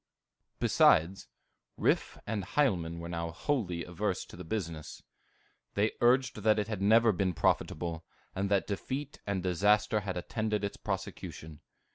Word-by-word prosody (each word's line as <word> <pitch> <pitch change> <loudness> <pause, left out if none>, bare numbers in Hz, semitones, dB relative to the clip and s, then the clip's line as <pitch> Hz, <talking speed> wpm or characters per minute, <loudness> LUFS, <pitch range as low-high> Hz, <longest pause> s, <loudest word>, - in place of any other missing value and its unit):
Besides, 90 +5 +4 0.5
Riffe - - +1
and 105 -2 -2
Hielman 90 - +1
were 85 0 -6
now 85 -1 -3
wholly 90 - -2
averse 90 +2 -2
to - - -13
the 90 - -8
business; 85 -5 -5 0.7
they 105 +2 +2
urged 125 0 +3
that 110 +1 +3
it 105 -1 0
had 105 -3 -4
never 110 +3 +5
been 95 -2 0
profitable, 85 +2 0 0.3
and 100 +1 -1
that 100 -1 +2
defeat 135 +8 -4
and 100 -3 -1
disaster 105 +4 +3
had 95 -3 -4
attended 105 +3 -2
its 100 - -2
prosecution. 80 -1 -5
100 Hz, 140 wpm, -31 LUFS, 85-110 Hz, 0.7 s, never